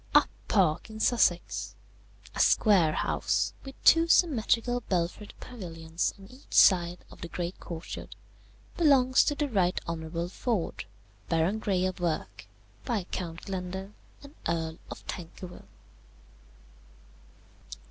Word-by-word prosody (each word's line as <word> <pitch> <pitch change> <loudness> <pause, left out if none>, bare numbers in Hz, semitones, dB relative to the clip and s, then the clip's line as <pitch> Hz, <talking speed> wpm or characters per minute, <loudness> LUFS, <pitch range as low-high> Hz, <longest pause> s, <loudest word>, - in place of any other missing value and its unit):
"Up - - +6 0.2
Park, 175 -4 +2
in 220 0 -8
Sussex, 215 -7 +1 0.6
a - - -6
square 190 -8 +5
house, - - 0
with 270 -1 -9
two 330 +1 +6
symmetrical 245 -7 +3
belfried 180 +3 -2
pavilions 165 -8 -4
on 195 - -13
each 255 +7 -11
side 175 -2 +5
of - - -14
the - - -5
great 175 +1 -5
courtyard, 165 0 -7 0.6
belongs 265 -6 +5
to 290 - +1
the 295 0 0
Right 190 -8 +1
Honourable 165 +1 -3
Forde, 205 - -2 0.4
Baron 165 +6 +1
Grey 190 -4 0
of 185 -1 -3
Werke, 170 -3 -3 0.4
Viscount 180 -7 -4
Glendale 190 +1 -5 0.3
and 280 +1 -12
Earl 165 0 -2
of - - -9
Tankerville. 180 +1 -8
185 Hz, 115 wpm, -29 LUFS, 170-230 Hz, 0.6 s, Up